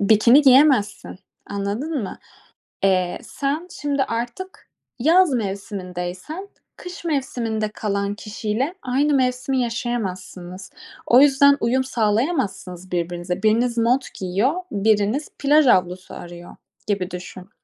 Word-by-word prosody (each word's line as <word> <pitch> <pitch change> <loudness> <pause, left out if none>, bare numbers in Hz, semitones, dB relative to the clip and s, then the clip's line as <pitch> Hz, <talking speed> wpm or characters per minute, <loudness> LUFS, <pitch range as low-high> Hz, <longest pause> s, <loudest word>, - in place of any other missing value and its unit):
bikini 225 +7 +5
giyemezsin. 265 -8 +4 0.3
Anladın 215 +8 -3
mı? 190 - -6 0.7
Eee, 185 -2 +1
sen 295 +5 -3
şimdi 285 -2 +1
artık 245 - -5 0.3
yaz 330 +3 +4
mevsimindeysen, 195 - -5 0.3
kış 360 -1 -9
mevsiminde 235 -7 -2
kalan 200 -1 -2
kişiyle 220 - -3
aynı 280 +4 +1
mevsimi 255 0 +1
yaşayamazsınız. 190 -6 -4 0.3
O 250 +3 +6
yüzden 280 0 +5
uyum 260 +3 +1
sağlayamazsınız 210 - -1
birbirinize. 175 +2 -3
Biriniz 235 +2 +2
mont 245 +3 +2
giyiyor, 195 - +1 0.2
biriniz 215 +6 +1
plaj 295 +1 +4
havlusu 185 -3 +1
arıyor, 175 0 -10 0.3
gibi 195 -3 -1
düşün. 180 +1 -9
225 Hz, 105 wpm, -22 LUFS, 190-270 Hz, 0.7 s, O